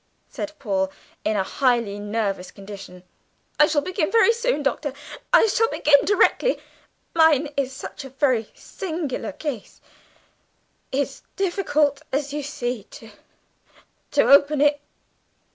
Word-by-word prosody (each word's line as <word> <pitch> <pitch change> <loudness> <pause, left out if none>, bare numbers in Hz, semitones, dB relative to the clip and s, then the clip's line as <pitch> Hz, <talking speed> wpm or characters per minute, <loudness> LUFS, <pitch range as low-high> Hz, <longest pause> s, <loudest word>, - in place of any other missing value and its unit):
said 310 - -6
Paul, 190 -6 -1 0.3
in 215 - 0
a 190 - +2
highly 235 -3 0
nervous 205 -3 -2
condition. 195 -2 -11 0.6
"I 300 - +7
shall 295 -2 +1
begin 370 0 -1
very 460 0 +5
soon, 470 -9 -1
Doctor, 280 0 -1 0.4
I - - +7
shall 455 +1 +2
begin 290 -1 +4
directly. 410 +5 +3 0.6
Mine 315 -3 +4
is 270 -2 -1
such 270 +1 -8
a 270 - -9
very 255 -4 +1
singular 320 -8 -5
case; 290 -6 -6 1.1
it's 275 +1 -2
difficult, 305 -7 +1
as 285 +1 -2
you 295 - -2
see, 245 -6 -4
to, 225 0 -13 1.0
to - - +3
open 285 +1 +5
it!" 290 0 +3
285 Hz, 125 wpm, -23 LUFS, 230-310 Hz, 1.1 s, I